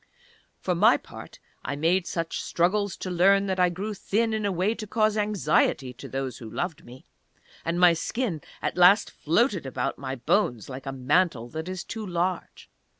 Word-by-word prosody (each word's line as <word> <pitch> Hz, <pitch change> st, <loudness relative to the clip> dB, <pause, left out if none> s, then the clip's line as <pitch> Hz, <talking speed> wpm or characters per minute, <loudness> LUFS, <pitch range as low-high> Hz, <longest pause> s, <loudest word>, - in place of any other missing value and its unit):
For 180 Hz, -, -1 dB
my 210 Hz, +8 st, +5 dB
part, -, -, -12 dB, 0.3 s
I 145 Hz, -, -3 dB
made 170 Hz, +5 st, +1 dB
such 165 Hz, -1 st, -3 dB
struggles 195 Hz, +3 st, 0 dB
to 185 Hz, -, -5 dB
learn 195 Hz, +3 st, +4 dB
that 190 Hz, -1 st, -2 dB
I 180 Hz, 0 st, +4 dB
grew 195 Hz, +5 st, -4 dB
thin 220 Hz, +3 st, 0 dB
in 215 Hz, -1 st, 0 dB
a -, -, 0 dB
way 185 Hz, +4 st, +1 dB
to 220 Hz, -2 st, -7 dB
cause 215 Hz, 0 st, +1 dB
anxiety 185 Hz, -10 st, +1 dB
to 125 Hz, -, -10 dB
those 135 Hz, -2 st, -4 dB
who 115 Hz, -, -8 dB
loved 170 Hz, -, -4 dB
me, 125 Hz, +2 st, -14 dB, 0.6 s
and 170 Hz, +1 st, -1 dB
my 180 Hz, -1 st, +7 dB
skin 175 Hz, -, -2 dB, 0.2 s
at -, -, -2 dB
last 185 Hz, +4 st, +6 dB
floated 185 Hz, -, +1 dB
about 130 Hz, +1 st, -3 dB
my 135 Hz, -1 st, -4 dB
bones, 120 Hz, -2 st, 0 dB
like 135 Hz, +1 st, -8 dB
a -, -, -2 dB
mantle 135 Hz, -1 st, +1 dB
that 160 Hz, +5 st, -5 dB
is 185 Hz, -1 st, -4 dB
too 225 Hz, -, -6 dB
large. 180 Hz, -1 st, -3 dB
175 Hz, 185 wpm, -26 LUFS, 145-200 Hz, 0.6 s, my